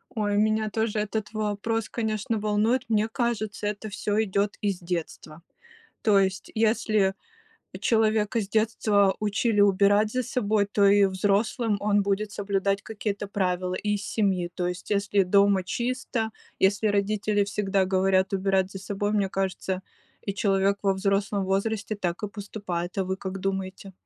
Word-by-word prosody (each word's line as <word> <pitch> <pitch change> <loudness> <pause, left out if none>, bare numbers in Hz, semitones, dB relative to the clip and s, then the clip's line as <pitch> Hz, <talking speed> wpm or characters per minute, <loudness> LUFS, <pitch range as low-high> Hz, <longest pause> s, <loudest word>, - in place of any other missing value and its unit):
Ой, 205 -2 0
меня 215 0 +2
тоже 220 0 -1
этот 215 +1 -3
вопрос, 215 +1 -2
конечно, 220 -1 -2
волнует. 215 +4 +1
Мне 215 0 +2
кажется, 220 -4 -2
это 210 +1 -4
всё 205 +1 0
идет 200 0 0
из 200 -3 -1
детства. 170 -3 -5 0.6
То 210 -3 +4
есть 190 -1 0
если 215 -3 +2 0.7
человека 220 -1 +2
с 200 - -5
детства 215 -2 +2
учили 210 +1 +1
убирать 205 +2 +4
за 255 - 0
собой, 215 -4 0
то 200 0 +2
и 200 0 +6
взрослым 205 +4 +1
он 205 0 +2
будет 200 +1 -1
соблюдать 200 0 -1
какие-то 205 -2 -4
правила 185 -2 -1
из 210 -1 0
семьи. 190 -6 0
То 180 - -1
есть 180 +2 -5
если 200 -1 +2
дома 200 +1 +4
чисто, 235 +2 -2 0.3
если 200 +3 +3
родители 205 0 +1
всегда 200 -1 0
говорят 190 0 +2
убирать 190 -1 +1
за 195 - -6
собой, 205 +1 -2
мне 205 -2 +1
кажется, 190 -1 -2 0.5
и 200 - -1
человек 200 0 +2
во 195 -1 +3
взрослом 195 +1 0
возрасте 200 +3 -1
так 180 -2 -3
и - - -2
поступает. 200 -4 -5
А 190 - +1
вы 190 +1 -2
как 190 0 -5
думаете? 190 0 -4
205 Hz, 150 wpm, -26 LUFS, 195-215 Hz, 0.7 s, и